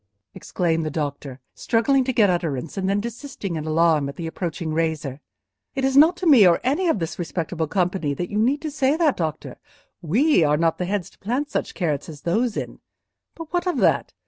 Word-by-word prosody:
exclaimed 165 -2 -1
the 155 - -2
doctor, 140 -3 -4
struggling 260 +4 +1
to 260 - -1
get 220 -4 +4
utterance, 165 -6 -2
and 190 -1 -1
then 200 +1 +1
desisting 235 -4 -6
in 155 -1 -4
alarm 155 -3 +2
at 140 - -8
the 170 - -6
approaching 165 -1 -4
razor. 155 -4 -2 0.5
"It 270 -1 0
is 270 0 +1
not 320 +5 +6
to 370 - -5
me, 260 - +7
or 170 - +4
any 295 +8 +1
of 325 - +2
this 165 -2 -5
respectable 165 -1 -3
company, 180 -4 -1
that 175 +4 -4
you 210 - -1
need 265 +7 +1
to 310 - -3
say 280 0 +1
that, 320 -5 +2
doctor. 160 -3 -4 0.4
We 220 - +3
are 150 0 +2
not 165 0 +1
the 180 - -1
heads 195 -1 -3
to - - -26
plant 255 +8 -2
such - - -3
carrots 155 -5 -2
as 150 -2 -10
those 220 +6 0
in. - - -5 0.6
But 330 0 -10
what 355 +1 0
of 360 - 0
that? - - +1
180 Hz, 210 wpm, -23 LUFS, 160-260 Hz, 0.6 s, me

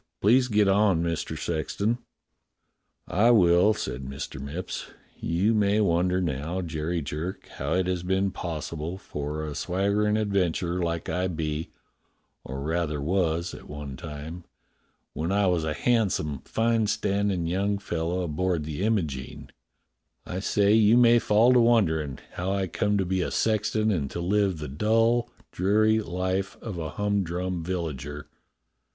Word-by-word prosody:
"Please 125 +5 +4
get 105 -3 +3
on, 95 -4 +3
Mister 85 -2 -2
Sexton." 100 +9 -1 1.1
"I 105 +6 +3
will," 95 -1 +5
said 65 - -4
Mr. 70 0 -6
Mipps. 75 +6 -5 0.3
"You 90 +7 +1
may 105 -1 +3
wonder 90 -2 +2
now, 85 +2 -2
Jerry 80 0 -2
Jerk, 80 +6 -5
how 70 +4 -1
it 95 0 +2
has 90 -1 -1
been 95 +2 0
possible 85 0 -4
for 75 -3 -5
a 75 - -5
swaggerin' 100 +5 +1
adventurer 90 -4 0
like 85 -1 -2
I 90 +1 0
be, 80 -2 -3 0.7
or 65 +1 -6
rather 80 0 -1
was 85 +1 0
one 75 -2 -8
time, 80 +4 -7 0.7
when 80 +4 -2
I 100 0 +3
was 90 -3 +2
a 80 -1 -1
handsome, 95 - +1
fine 115 -1 +1
standin* 100 -3 0
young 100 +4 0
fellow 85 -2 -2
aboard 85 0 -1
the 75 +2 -5
Imogene 80 -12 -2 0.4
— - - -50
I 90 - -4
say 100 +1 +2
you 110 +1 +6
may 120 -1 +6
fall 115 +3 +4
to 125 - +6
wonderin' 80 - +2
how 90 +2 -3
I 100 -1 0
come 105 +3 0
to 95 - +1
be 95 +1 0
a - - -1
sexton 110 0 +1
and 75 -8 -1
to - - -5
live 95 0 +1
the 75 -1 -5
dull, 115 - +2 0.2
dreary 110 +4 +3
life 95 0 -2
of 105 -7 -6
a 80 -1 -3
hum 100 +4 0
drum 90 0 -3
villager. 75 -5 -4
90 Hz, 150 wpm, -26 LUFS, 80-105 Hz, 1.1 s, you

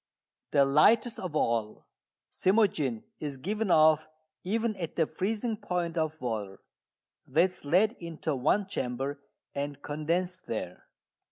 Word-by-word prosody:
The 140 - +4
lightest 220 - +4
of 180 -5 -5
all, 115 -6 0 0.5
cymogene, 175 - +2 0.2
is 145 -3 -4
given 210 +8 -2
off 155 -1 +5 0.4
even 220 +3 0
at 170 -4 -5
the 165 - +3
freezing 220 +7 -2
point 180 -5 -2
of 160 -1 -1
water. 110 -6 -3 0.7
That 165 +7 +3
is 180 - -9
led 185 +9 +4
into 165 -3 -3
one 155 +10 +2
chamber 135 -4 -3 0.3
and 140 0 -4
condensed 175 +5 -2
there. 90 -5 -5
160 Hz, 125 wpm, -29 LUFS, 140-190 Hz, 0.7 s, off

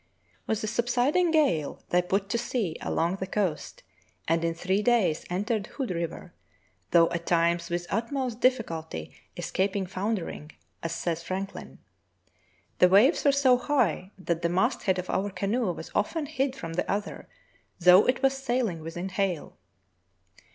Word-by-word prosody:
With 220 -1 0
the 215 - -2
subsiding 245 +10 +2
gale 285 - +1
they 180 - +3
put 195 +2 -1
to 235 - 0
sea 230 -8 -2
along 170 +4 0
the 190 - -4
coast, 190 -6 -2 0.4
and 165 +1 +1
in 165 0 0
three 190 +4 0
days 215 -9 +2
entered 205 +3 -1
Hood 265 -8 -4
River, 170 0 -4 0.6
though 165 -1 +6
at 170 0 -4
times 170 0 +2
with 175 0 -2
utmost 240 +2 -2
difficulty 165 - -1 0.2
escaping 195 0 -1
foundering, 185 -5 -4 0.3
as 165 0 -3
sa3's 170 -1 -2
Franklin: 190 +3 -6 1.0
"The 180 - +7
waves 215 - +5
were 285 - +5
so 270 -3 +4
high 245 - 0
that 170 -3 -2
the 170 - +1
mast 180 +2 +1
head 190 -1 +2
of 180 0 -4
our 200 +2 -1
canoe 200 +2 -1
was - - -8
often 310 +9 0
hid 275 -2 -1
from 165 -10 -6
the 180 - -1
other, 205 +1 -4 0.5
though 180 +2 +7
it 255 +1 +1
was 270 0 +4
sailing 240 -10 -1
within 175 +4 -5
hail." 185 -4 -2
195 Hz, 155 wpm, -27 LUFS, 170-240 Hz, 1.0 s, The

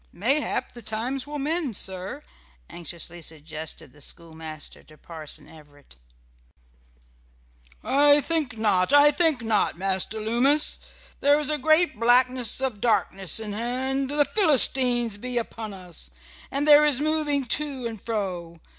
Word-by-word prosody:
"Mayhap 265 - 0
the 240 - -10
times 245 +5 -4
will 295 0 -6
mend, 295 - -2
sir," 190 +11 -5 0.5
anxiously 175 +1 -5
suggested 160 0 -8
the 145 - -16
schoolmaster 160 -1 -7
to 155 - -19
Parson 160 -3 -8
Everett. 145 - -18 1.9
"I 290 +1 +5
think 295 -6 -2
not, 205 -1 +1
I 290 0 +7
think 300 -4 +1
not, 220 -6 0
Master 190 +3 -1
Loomis. 245 +8 +2 0.4
There 285 +1 +4
is 300 0 -2
a 300 - -2
great 310 -3 +2
blackness 250 0 +2
of 250 -7 -3
darkness 195 -5 +1
in 215 -2 -6
hand, 260 +4 -2
the 290 0 +2
Philistines 255 - +5
be 250 +2 -4
upon 225 -2 -5
us, 180 - -7 0.4
and 285 +2 -2
there 295 0 +7
is 295 -4 +2
moving 295 -2 -1
to 275 0 0
and 225 -4 -6
fro. 180 -7 -5
240 Hz, 135 wpm, -24 LUFS, 185-285 Hz, 1.9 s, I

